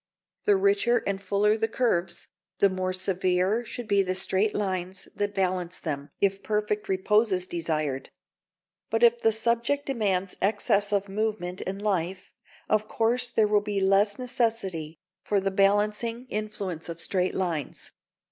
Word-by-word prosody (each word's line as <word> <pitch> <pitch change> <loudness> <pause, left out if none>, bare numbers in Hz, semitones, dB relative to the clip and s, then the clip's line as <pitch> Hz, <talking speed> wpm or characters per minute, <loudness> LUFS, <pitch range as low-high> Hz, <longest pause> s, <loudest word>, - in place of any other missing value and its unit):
The 415 - +5
richer 385 - +2
and 195 -1 -2
fuller 200 +2 +2
the 225 0 0
curves, 190 -8 -1 0.3
the 200 - +4
more 185 0 -2
severe 185 +3 +1
should 240 0 -7
be 200 -2 +4
the 185 -1 -1
straight 195 +3 0
lines 185 -2 -3
that 205 0 -2
balance 185 -2 -1
them, 145 -3 -4
if 195 0 +1
perfect 210 0 -1
repose 210 +3 +2
is 180 -1 0
desired. 155 -6 -2 0.8
But 225 +1 0
if 235 0 +5
the 225 - +4
subject 235 +6 0
demands 195 -8 -1
excess 205 0 +2
of 200 -1 +1
movement 195 -3 -2
and 195 +1 -3
life, 190 -2 -2 0.3
of 215 0 +1
course 240 +3 +1
there 220 -2 +3
will 210 0 +3
be 205 -1 -2
less 195 +2 +3
necessity 225 - -2 0.3
for 205 - +1
the 195 0 -1
balancing 210 +5 +1
influence 200 -6 -4
of 170 0 -6
straight 185 +1 0
lines. 170 -7 -3
200 Hz, 150 wpm, -27 LUFS, 185-220 Hz, 0.8 s, The